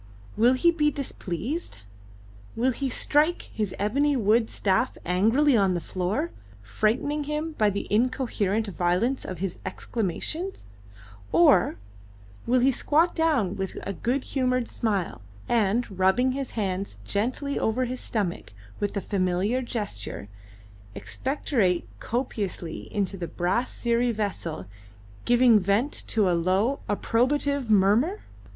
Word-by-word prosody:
Will 235 Hz, +4 st, +5 dB
he 340 Hz, +7 st, +4 dB
be 300 Hz, -3 st, +2 dB
displeased? 270 Hz, -, -4 dB, 0.8 s
Will 245 Hz, +3 st, +2 dB
he 270 Hz, +2 st, -2 dB
strike 300 Hz, +6 st, +1 dB
his 210 Hz, -4 st, -2 dB
ebony 275 Hz, +8 st, +1 dB
wood 225 Hz, +1 st, +3 dB
staff 195 Hz, +5 st, 0 dB
angrily 225 Hz, +11 st, +3 dB
on 195 Hz, -4 st, +3 dB
the -, -, 0 dB
floor, 190 Hz, -, -2 dB, 0.3 s
frightening 240 Hz, -, 0 dB
him 300 Hz, +2 st, -2 dB
by 210 Hz, -1 st, +4 dB
the 200 Hz, 0 st, -3 dB
incoherent 225 Hz, -3 st, +1 dB
violence 195 Hz, +7 st, 0 dB
of 185 Hz, -, -6 dB
his 185 Hz, +1 st, -4 dB
exclamations; 235 Hz, -, -4 dB, 0.7 s
or 175 Hz, -1 st, +5 dB, 0.7 s
will 250 Hz, +1 st, +3 dB
he 265 Hz, +2 st, +5 dB
squat 315 Hz, +6 st, +2 dB
down 295 Hz, -, +1 dB
with 190 Hz, -1 st, -4 dB
a 200 Hz, -, -3 dB
good 250 Hz, +9 st, -1 dB
humoured 255 Hz, -3 st, 0 dB
smile, 200 Hz, -, -2 dB, 0.3 s
and, 215 Hz, -3 st, +1 dB
rubbing 215 Hz, +8 st, +3 dB
his 270 Hz, 0 st, -3 dB
hands 195 Hz, -2 st, -2 dB
gently 255 Hz, +7 st, -1 dB
over 245 Hz, +4 st, +1 dB
his 250 Hz, +1 st, -4 dB
stomach 190 Hz, -, -3 dB, 0.3 s
with 205 Hz, 0 st, -2 dB
a -, -, 0 dB
familiar 190 Hz, +6 st, 0 dB
gesture, 205 Hz, -, -5 dB, 0.7 s
expectorate 225 Hz, -, -1 dB
copiously 205 Hz, -8 st, -4 dB
into 200 Hz, -1 st, -1 dB
the 175 Hz, -2 st, -4 dB
brass 185 Hz, +10 st, 0 dB
siri 235 Hz, 0 st, +1 dB
vessel, 200 Hz, -, -3 dB, 0.6 s
giving 240 Hz, -2 st, +5 dB
vent 200 Hz, +9 st, +1 dB, 0.2 s
to 215 Hz, -4 st, +2 dB
a 180 Hz, -, +3 dB
low, 190 Hz, +10 st, +1 dB
approbative 260 Hz, +5 st, +1 dB
murmur? 215 Hz, -, +3 dB
225 Hz, 125 wpm, -26 LUFS, 195-260 Hz, 0.8 s, Will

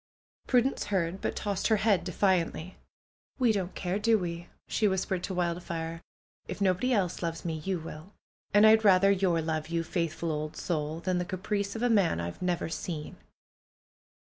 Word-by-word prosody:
Prudence 255 Hz, +1 st, +2 dB
heard, 190 Hz, -2 st, -1 dB
but -, -, -2 dB
tossed 200 Hz, -2 st, -1 dB
her 220 Hz, -, +4 dB
head 200 Hz, -4 st, +2 dB
defiantly. 180 Hz, -1 st, 0 dB, 0.6 s
'^We 240 Hz, -4 st, +4 dB
don't 190 Hz, -3 st, -3 dB
care, 185 Hz, +2 st, -2 dB
do 225 Hz, +1 st, +4 dB
w^e?" 175 Hz, -2 st, -5 dB, 0.2 s
she 215 Hz, -, +1 dB
whispered 190 Hz, -1 st, -1 dB
to 195 Hz, -, -5 dB
Wildfire, 170 Hz, -1 st, -3 dB, 0.6 s
nobody 195 Hz, +5 st, +2 dB
else 195 Hz, -7 st, 0 dB
loves 165 Hz, -1 st, -3 dB
me, 165 Hz, -2 st, -2 dB
you 185 Hz, +4 st, -2 dB
will. 160 Hz, +3 st, -9 dB, 0.4 s
And 205 Hz, +1 st, +6 dB
I'd 220 Hz, 0 st, +6 dB
rather 195 Hz, -1 st, +6 dB
your 185 Hz, -4 st, +2 dB
love, 155 Hz, -1 st, -2 dB
you 165 Hz, 0 st, 0 dB
faithful 165 Hz, -1 st, -2 dB
old 155 Hz, 0 st, -4 dB
soul! 155 Hz, -1 st, -2 dB
than 180 Hz, 0 st, 0 dB
the -, -, 0 dB
caprice 200 Hz, +3 st, -2 dB
of 225 Hz, -, -3 dB
a -, -, +4 dB
man 195 Hz, -, +3 dB
I've 85 Hz, -, -5 dB
never 180 Hz, -1 st, 0 dB
seen!" 160 Hz, -1 st, -5 dB
180 Hz, 165 wpm, -29 LUFS, 165-200 Hz, 0.6 s, And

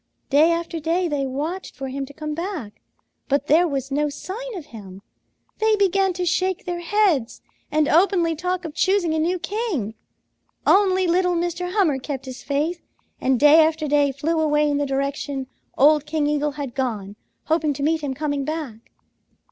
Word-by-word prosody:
"Day 300 Hz, +4 st, +6 dB
after 335 Hz, 0 st, -2 dB
day 335 Hz, +3 st, 0 dB
they 285 Hz, -3 st, -1 dB
watched 310 Hz, +8 st, -4 dB
for 270 Hz, 0 st, -5 dB
him 275 Hz, +1 st, -4 dB
to 285 Hz, -, -12 dB
come 305 Hz, -1 st, -4 dB
back, 330 Hz, -, -5 dB, 0.5 s
but 280 Hz, 0 st, +1 dB
there 325 Hz, +5 st, +4 dB
was 275 Hz, -2 st, -3 dB
no 295 Hz, +2 st, +1 dB
sign 430 Hz, +10 st, -6 dB
of 330 Hz, -, -8 dB
him; 195 Hz, -3 st, -10 dB, 0.6 s
they 440 Hz, 0 st, +3 dB
began 390 Hz, -1 st, +2 dB
to 360 Hz, 0 st, -2 dB
shake 370 Hz, +1 st, 0 dB
their 350 Hz, -1 st, -3 dB
heads 345 Hz, -, +1 dB, 0.3 s
and 305 Hz, 0 st, +2 dB
openly 340 Hz, 0 st, +3 dB
talk 360 Hz, +2 st, -2 dB
of 315 Hz, -, -6 dB
choosing 375 Hz, -2 st, +1 dB
a 315 Hz, -, 0 dB
new 350 Hz, +4 st, +1 dB
king. 365 Hz, -, -3 dB, 0.7 s
Only 375 Hz, -2 st, +4 dB
little 360 Hz, +1 st, +2 dB
Mr. 350 Hz, +1 st, -2 dB
Hummer 340 Hz, -10 st, +2 dB
kept 270 Hz, 0 st, -5 dB
his 260 Hz, 0 st, -8 dB
faith 305 Hz, +5 st, -1 dB, 0.4 s
and 260 Hz, -2 st, +1 dB
day 300 Hz, +2 st, +7 dB
after 310 Hz, -1 st, 0 dB
day 290 Hz, -1 st, +3 dB
flew 315 Hz, +5 st, -1 dB
away 300 Hz, -1 st, +2 dB
in 290 Hz, -1 st, +1 dB
the 290 Hz, 0 st, 0 dB
direction 275 Hz, 0 st, -2 dB, 0.3 s
old 300 Hz, +2 st, +5 dB
King 305 Hz, -1 st, 0 dB
Eagle 295 Hz, 0 st, 0 dB
had 280 Hz, -4 st, -5 dB
gone, 215 Hz, -7 st, -3 dB, 0.3 s
hoping 315 Hz, -1 st, +1 dB
to 280 Hz, +1 st, -5 dB
meet 320 Hz, +1 st, +1 dB
him 275 Hz, -3 st, -3 dB
coming 285 Hz, -1 st, -2 dB
back. 275 Hz, -7 st, -6 dB
310 Hz, 180 wpm, -22 LUFS, 280-355 Hz, 0.7 s, day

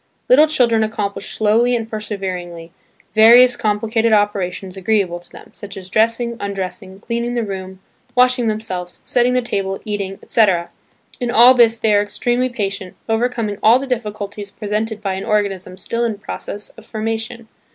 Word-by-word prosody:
Little 295 Hz, +5 st, +6 dB
children 240 Hz, -7 st, +2 dB
accomplish 210 Hz, -2 st, -3 dB
slowly 230 Hz, +3 st, +2 dB
and 225 Hz, -2 st, -3 dB
perseveringly, 185 Hz, -6 st, -5 dB, 0.4 s
various 240 Hz, +3 st, +7 dB
complicated 220 Hz, +1 st, 0 dB
operations 195 Hz, -3 st, 0 dB
agreeable 190 Hz, -3 st, 0 dB
to 175 Hz, -, -19 dB
them, -, -, -14 dB
such 200 Hz, -1 st, -9 dB
as 185 Hz, -1 st, -10 dB
dressing, 230 Hz, +2 st, +1 dB
undressing, 195 Hz, 0 st, -5 dB
cleaning 235 Hz, +1 st, -3 dB
the 235 Hz, -, 0 dB
room, 190 Hz, -2 st, -7 dB, 0.3 s
washing 250 Hz, -1 st, +3 dB
themselves, 200 Hz, -5 st, -4 dB
setting 245 Hz, 0 st, +2 dB
the 250 Hz, -1 st, +1 dB
table, 195 Hz, -4 st, -2 dB
eating, 200 Hz, -2 st, -3 dB
etc. 190 Hz, -7 st, +2 dB, 0.5 s
In 245 Hz, -2 st, -2 dB
all 240 Hz, +2 st, +7 dB
this 230 Hz, -2 st, +4 dB
they 220 Hz, -1 st, +1 dB
are 205 Hz, -, +4 dB
extremely 240 Hz, +5 st, -1 dB
patient, 200 Hz, -5 st, -4 dB
overcoming 225 Hz, -2 st, -1 dB
all 225 Hz, +3 st, +6 dB
the 270 Hz, -, -4 dB
difficulties 210 Hz, -5 st, -4 dB
pre 205 Hz, +1 st, -8 dB
sented 215 Hz, 0 st, -2 dB
by 195 Hz, -2 st, -1 dB
an 190 Hz, -, -4 dB
organism 195 Hz, -4 st, -1 dB
still 230 Hz, +5 st, -2 dB
in 225 Hz, -3 st, -1 dB
process 205 Hz, 0 st, -6 dB
of -, -, -16 dB
formation. 225 Hz, +1 st, -4 dB
215 Hz, 160 wpm, -19 LUFS, 195-235 Hz, 0.5 s, various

